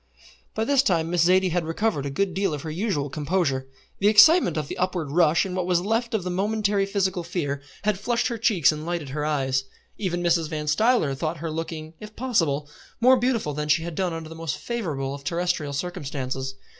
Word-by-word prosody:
By 220 Hz, -, 0 dB
this 280 Hz, 0 st, +4 dB
time 170 Hz, -9 st, +1 dB
Miss 175 Hz, -2 st, +2 dB
Zaidie 185 Hz, 0 st, +4 dB
had 175 Hz, 0 st, 0 dB
recovered 165 Hz, -2 st, -1 dB
a -, -, -2 dB
good 185 Hz, +7 st, -1 dB
deal 190 Hz, -3 st, 0 dB
of 145 Hz, -, -8 dB
her 160 Hz, -, -4 dB
usual 165 Hz, -5 st, -1 dB
composure. 145 Hz, -2 st, -1 dB, 0.3 s
The 200 Hz, -, +3 dB
excitement 215 Hz, -, +6 dB
of 150 Hz, -2 st, -2 dB
the -, -, -6 dB
upward 180 Hz, -5 st, -1 dB
rush, 165 Hz, +1 st, +3 dB
and 185 Hz, -1 st, -4 dB
what 180 Hz, -1 st, -1 dB
was 175 Hz, -1 st, +2 dB
left 225 Hz, +4 st, -1 dB
of 205 Hz, -, -1 dB
the 180 Hz, -, -3 dB
momentary 200 Hz, +1 st, 0 dB
physical 190 Hz, -2 st, 0 dB
fear, 160 Hz, -5 st, -3 dB, 0.2 s
had 210 Hz, -2 st, 0 dB
flushed 235 Hz, +3 st, 0 dB
her 235 Hz, -2 st, -4 dB
cheeks 210 Hz, -10 st, +4 dB
and 155 Hz, 0 st, -6 dB
lighted 170 Hz, -4 st, -3 dB
her 150 Hz, +2 st, -3 dB
eyes. 135 Hz, -3 st, 0 dB, 0.4 s
Even 175 Hz, -3 st, -2 dB
Mrs. 170 Hz, -2 st, +2 dB
Van 155 Hz, -2 st, -3 dB
Stuyler 155 Hz, -, +2 dB
thought 155 Hz, +5 st, -3 dB
her 160 Hz, +1 st, -4 dB
looking, 160 Hz, 0 st, -5 dB
if 215 Hz, 0 st, -10 dB
possible, 165 Hz, -, 0 dB, 0.3 s
more 255 Hz, +2 st, +6 dB
beautiful 235 Hz, -, 0 dB
than 150 Hz, +1 st, -3 dB
she 160 Hz, +2 st, +3 dB
had 170 Hz, 0 st, -5 dB
done 180 Hz, +2 st, -1 dB
under 165 Hz, -1 st, -6 dB
the 160 Hz, -, -9 dB
most 165 Hz, -4 st, -4 dB
favourable 155 Hz, -, -3 dB
of 140 Hz, 0 st, -8 dB
terrestrial 170 Hz, -3 st, -1 dB
circumstances. 135 Hz, -4 st, -4 dB
170 Hz, 210 wpm, -25 LUFS, 150-200 Hz, 0.4 s, excitement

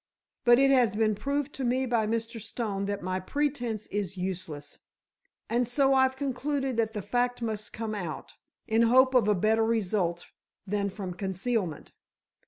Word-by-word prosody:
But 240 Hz, 0 st, +7 dB
it 275 Hz, +1 st, +5 dB
has 245 Hz, -6 st, +4 dB
been 215 Hz, 0 st, +2 dB
proved 280 Hz, +7 st, -2 dB
to 270 Hz, -, -4 dB
me 255 Hz, +2 st, +1 dB
by 235 Hz, -3 st, +1 dB
Mr. 230 Hz, +1 st, -2 dB
Stone 200 Hz, -3 st, -3 dB
that 200 Hz, -1 st, -3 dB
my 185 Hz, +1 st, -1 dB
pretence 245 Hz, -1 st, -2 dB
is 195 Hz, -2 st, -3 dB
useless, 175 Hz, -6 st, -5 dB, 0.7 s
and 240 Hz, +1 st, +1 dB
so 270 Hz, +2 st, +3 dB
I've 265 Hz, 0 st, +3 dB
concluded 270 Hz, 0 st, -2 dB
that 220 Hz, -1 st, +1 dB
the 210 Hz, -3 st, -4 dB
fact 245 Hz, +2 st, 0 dB
must 215 Hz, -2 st, -3 dB
come 220 Hz, -1 st, -4 dB
out, 175 Hz, -7 st, -5 dB, 0.3 s
in 225 Hz, +1 st, +3 dB
hope 260 Hz, +3 st, +5 dB
of 245 Hz, -5 st, +4 dB
a 210 Hz, -, +4 dB
better 220 Hz, +4 st, +2 dB
result 195 Hz, -6 st, 0 dB, 0.4 s
than 200 Hz, 0 st, -1 dB
from 190 Hz, -2 st, -6 dB
concealment. 190 Hz, -2 st, -2 dB
225 Hz, 165 wpm, -28 LUFS, 200-250 Hz, 0.7 s, But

